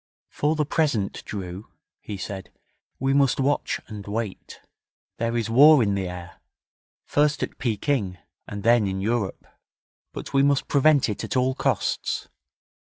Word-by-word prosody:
'For 150 +2 0
the 150 -1 +1
present, 140 -10 0
Drew,' 95 -1 -6 0.3
he 105 - -7
said, 95 0 -6 0.5
'we 135 +1 +1
must 140 -2 +3
watch 140 +2 0
and 105 -3 -9
wait. 105 -1 -5 0.6
There 115 +1 -1
is 115 - -1
war 140 +4 +7
in 100 -2 +1
the 95 -2 -1
air 85 -1 -9 0.6
first 150 0 +1
at - - -5
Pekin, 110 -5 -1 0.3
and 100 -1 -6
then 115 -2 +4
in 95 0 -2
Europe. 105 -1 -2 0.7
But - - -8
we 135 - +4
must 140 0 +2
prevent 145 0 +4
it 105 - -4
at - - -2
all 130 +1 +2
costs. - - -1
115 Hz, 150 wpm, -25 LUFS, 100-140 Hz, 0.7 s, war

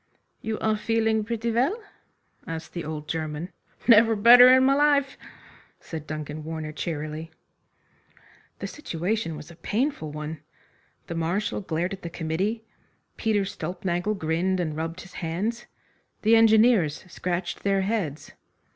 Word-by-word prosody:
"You 220 0 -3
are 220 0 +2
feeling 220 0 +1
pretty 230 +1 -2
well?" 265 - +1 0.7
asked 165 0 -6
the 170 - -4
old 150 0 -6
German. 155 +1 -3 0.4
"Never 225 -1 +7
better 245 +4 +9
in 260 0 +6
my 270 +1 +5
life," 280 -1 +3 0.6
said 160 -2 -8
Duncan 155 0 -5
Warner 160 -1 -5
cheerily. 155 0 -4 1.3
The - - -6
situation 180 - -3
was 150 +2 -10
a - - -13
painful 210 - -2
one. 150 +1 -6 0.6
The - - -6
Marshal 170 +7 -1
glared 175 0 -2
at 195 - -8
the 170 - -5
committee. 180 +8 -2 0.5
Peter 210 -3 +1
Stulpnagel 180 +3 -2
grinned 180 +3 0
and 160 -4 -2
rubbed 165 +3 -4
his 185 - -14
hands. 200 +9 -3 0.6
The 220 +2 +6
engineers 220 -9 +4
scratched 180 0 -3
their 195 -1 +1
heads. 190 -8 -2
185 Hz, 135 wpm, -26 LUFS, 160-225 Hz, 1.3 s, better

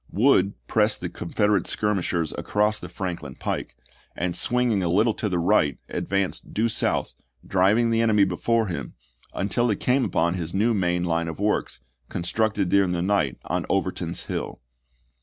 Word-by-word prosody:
Wood 100 -4 +3
pressed - - +1
the - - -3
Confederate 105 +2 0
skir 105 0 0
mishers 85 -3 -1
across 105 +1 0
the 90 - -8
Franklin 85 -7 -5
pike, - - -4 0.4
and 85 0 -2
swinging 120 +1 +2
a 85 - 0
little 105 +6 +3
to 105 - -3
the 90 - 0
right, 85 -4 +2
advanced 100 -1 -2
due 115 +2 +2
south, 110 - 0 0.3
driving 105 +5 +3
the 115 0 +2
enemy 110 -3 +4
before 110 +5 +1
him, 85 -8 -5 0.4
until 120 +5 0
he 105 - +2
came 125 +6 +1
upon 85 -5 +1
his 85 -1 -4
new 110 +4 +2
main 90 -3 0
line 85 -1 0
of 80 +1 -6
works, 100 -10 -1 0.3
constructed 100 +2 0
during 95 -2 +3
the 85 -1 -1
night 95 -9 +1
on - - -2
Overton's - - -1
Hill. - - -5
95 Hz, 165 wpm, -24 LUFS, 85-110 Hz, 0.4 s, enemy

